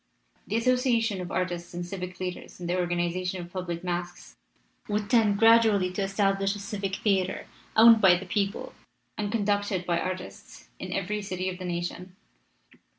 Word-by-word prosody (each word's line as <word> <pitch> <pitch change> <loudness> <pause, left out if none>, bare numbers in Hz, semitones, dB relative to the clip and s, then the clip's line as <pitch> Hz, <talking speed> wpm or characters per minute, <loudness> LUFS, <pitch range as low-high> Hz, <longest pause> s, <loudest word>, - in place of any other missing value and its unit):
The 210 - -2
as 230 - 0
sociation 240 -6 +2
of 180 - -6
artists 175 -2 -3
and 175 0 -4
civic 180 0 -6
leaders 180 -1 -6
in 175 - -6
the 175 +1 0
or 180 -1 0
ganization 175 +1 -1
of 175 0 -9
public 180 -2 -4
masques 175 0 -5 0.5
would 210 0 -2
tend 215 -4 +4
gradually 220 -4 +5
to 185 - -3
establish 195 0 +1
a - - -7
civic 200 -2 -3
theater, 195 -3 0 0.3
owned 225 0 +8
by 185 -2 +7
the 185 +2 -5
people 200 +2 -2 0.4
and 205 -1 -3
conducted 205 -4 0
by 170 -1 +1
artists, 185 0 -7
in - - -6
every 210 +2 -2
city 185 -2 -3
of 180 0 -7
the 185 - -6
nation. 175 +1 -4
190 Hz, 170 wpm, -27 LUFS, 180-205 Hz, 0.5 s, owned